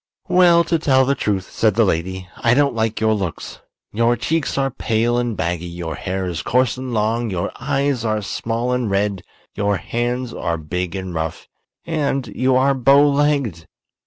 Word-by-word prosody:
"Well, 175 -2 +5
to 165 0 0
tell 130 -4 +3
the 140 - +2
truth," 100 -7 -2
said 110 -3 +1
the 115 0 +4
lady, 95 +1 -2
"I 115 +1 +3
don't 140 -1 +3
like 110 -1 -1
your 110 0 +2
looks. 95 -6 -4 0.3
Your 115 +2 +2
cheeks 160 +5 -1
are 135 -1 +1
pale 120 +1 0
and 120 -3 -2
baggy, 85 +1 -2
your 85 -2 -5
hair 95 +3 -3
is 85 -2 -3
coarse 125 -2 +1
and 130 0 -6
long, 115 +1 0
your 90 -3 -2
eyes 140 -2 0
are 110 -2 -1
small 115 +5 -2
and 125 -3 -1
red, 100 -1 0 0.3
your 100 -1 0
hands 120 +3 -3
are 85 0 -2
big 90 +3 -4
and 95 -2 -5
rough, 80 -1 -4 0.4
and 140 -5 -1
you 130 0 +2
are 135 +2 +4
bow 135 +3 +5
legged." 140 - 0
115 Hz, 180 wpm, -20 LUFS, 95-130 Hz, 0.4 s, Well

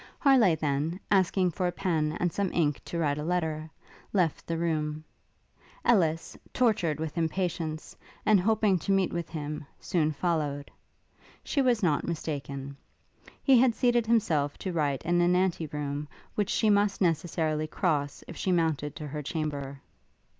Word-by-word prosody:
Harleigh 255 - +5
then, 155 +3 -1
asking 185 -2 +3
for 180 +2 -1
a - - 0
pen 160 -4 -1
and 175 -1 0
some 200 -2 -1
ink 150 -4 +1
to 170 - -5
write 150 -3 0
a - - -3
letter, 160 -2 -1 0.4
left 180 -6 +1
the 165 - -1
room. 155 -2 -1 0.8
Ellis, 165 -9 +2 0.2
tortured 190 - +2
with 160 +1 -3
impatience, 165 -1 -2 0.3
and 215 -2 +5
hoping 210 -1 +2
to 195 - -2
meet 195 -2 +2
with 170 -1 -3
him, 150 -1 -5 0.2
soon 160 -4 0
followed. 150 -3 -2 0.7
She 280 - 0
was 245 -5 +2
not 155 -5 +1
mistaken: 140 -4 -4 0.7
he 265 -3 +6
had 245 -2 +4
seated 240 -2 +2
himself 160 -11 +1
to 185 - -4
write 145 -5 0
in 175 +1 +2
an 175 +1 +3
ante 180 -3 +1
room, 145 0 -4 0.3
which 205 -2 -1
she 215 -2 +3
must 205 0 +2
necessarily 160 -2 0
cross 150 -5 -1
if - - -8
she 190 - -1
mounted 160 -4 0
to 150 - -6
her 150 +1 -5
chamber. 140 -3 -4
165 Hz, 155 wpm, -28 LUFS, 150-190 Hz, 0.8 s, he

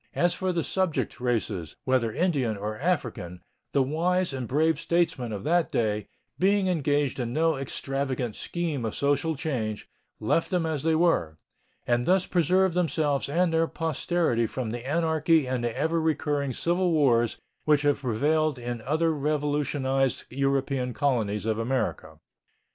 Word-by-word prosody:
As 175 0 +3
for 185 -1 -1
the 170 -2 -1
subject 185 -4 -1
races, 110 -9 -2
whether 130 -3 +1
Indian 135 - 0
or 105 +2 -4
African, 120 - -2 0.3
the 140 - +3
wise 175 +4 0
and 130 -3 -4
brave 160 +5 +2
statesmen 165 -9 0
of 100 -2 -5
that 170 +1 +2
day, 105 -2 0 0.3
being 195 +1 +3
engaged 145 -6 0
in 120 -1 -2
no 160 +1 +2
extravagant 135 -3 -3
scheme 165 -7 -3
of 110 - -3
social 145 +3 +1
change, 115 -8 -3 0.3
left 110 +10 +1
them 180 -3 0
as 155 -3 -1
they 160 +1 +2
were, 155 - +2 0.5
and 120 0 +1
thus 185 0 +4
preserved 185 +1 +2
themselves 155 -5 0
and 170 +3 +1
their 165 0 +3
posterity 160 -7 0
from 120 -1 -4
the 120 +3 -5
anarchy 160 -1 +2
and 125 -1 -2
the 120 0 -2
ever 160 +3 +1
recurring 145 -3 0
civil 175 +7 0
wars 120 -7 +3 0.3
which 150 -1 +3
have 145 -1 +2
prevailed 145 +5 +1
in 120 -1 -5
other 160 +6 +1
revolutionized 145 -2 0
European 135 -1 0
colonies 110 -8 0
of 110 0 0
America. 115 -10 -2
145 Hz, 150 wpm, -27 LUFS, 120-165 Hz, 0.5 s, thus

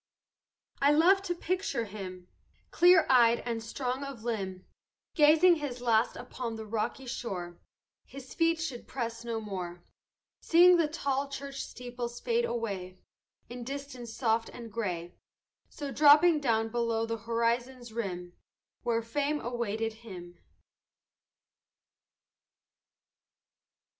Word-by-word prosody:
"I 280 +1 +5
love 360 +6 +5
to 360 -3 -3
picture 355 -9 -2
him, 185 -3 -8 0.4
Clear 360 +1 +6
eyed 235 -3 +5
and 235 -1 -3
strong 255 +3 -3
of 275 -5 -7
limb, 190 -6 -3 0.5
Gazing 325 +3 +6
his 280 -5 -5
last 230 -1 +2
upon 245 -1 -5
the 220 0 -7
rocky 220 +5 -3
shore 180 -8 -5 0.5
His 265 -1 -11
feet 330 0 +2
should 275 -7 -5
press 230 -3 -4
no 230 -1 -3
more; 180 -5 -6 0.6
Seeing 350 +2 +6
the 330 -2 +3
tall 280 -3 -2
church 275 0 -6
steeples 245 -1 -6
fade 475 0 +1
away 195 - -4 0.5
In 245 0 -7
distance 270 -2 -7
soft 225 -1 0
and 230 -2 -10
gray; 180 -6 -3 0.6
So 285 -2 -6
dropping 300 +3 +6
down 225 -5 +1
below 230 -1 0
the 230 0 -3
horizon's 235 +2 -1
rim 180 -6 -4 0.5
Where 230 -1 0
fame 290 +6 -1
awaited 225 -3 -2
him. 175 -6 -10
240 Hz, 120 wpm, -30 LUFS, 225-280 Hz, 0.6 s, Clear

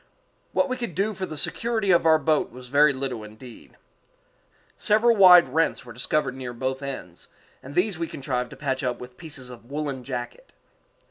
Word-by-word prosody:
What 280 - +2
we 255 -1 -3
could 235 -10 -5
do 205 +4 0
for 190 -1 -4
the 155 - -7
security 220 +5 0
of 170 -2 +4
our 160 0 +6
boat 155 0 +1
was 125 +1 -11
very 145 +2 +5
little 130 -4 -4
indeed. 110 +3 -12 1.0
Several 225 +2 +3
wide 180 -7 +8
rents 160 +1 0
were 120 - -10
discovered 125 +3 -1
near 130 -2 -6
both 130 +2 -3
ends, 130 -11 -7 0.3
and 140 +3 -10
these 180 -1 +1
we 165 - -2
contrived 125 -4 -3
to - - -11
patch 135 -3 -2
up 125 -1 -2
with 125 0 -10
pieces 145 -5 -8
of 120 0 -13
woollen 140 -3 -4
jacket. 130 - -6
140 Hz, 185 wpm, -25 LUFS, 125-175 Hz, 1.0 s, wide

